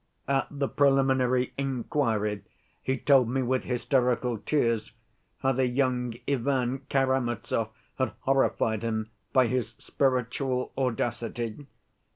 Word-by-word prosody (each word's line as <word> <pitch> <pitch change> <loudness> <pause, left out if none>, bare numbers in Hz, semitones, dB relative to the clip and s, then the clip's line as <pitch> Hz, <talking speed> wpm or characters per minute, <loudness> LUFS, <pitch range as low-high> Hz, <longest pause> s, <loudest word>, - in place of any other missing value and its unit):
At 135 0 +1
the 140 -1 -2
preliminary 130 -3 +2
inquiry, 115 -6 0 0.4
he 130 0 -1
told 135 -5 +4
me 130 +1 0
with 130 +1 0
hysterical 125 -2 +1
tears 115 -7 0 0.5
how 135 - +3
the 130 0 +1
young 125 -2 0
Ivan 130 -1 0
Karamazov 125 -4 0 0.3
had 130 - 0
horrified 130 -5 +1
him 110 -1 -2 0.2
by 130 -1 +5
his 120 -1 -1
spiritual 130 -1 -1
audacity. 120 0 -2
125 Hz, 110 wpm, -28 LUFS, 115-135 Hz, 0.5 s, by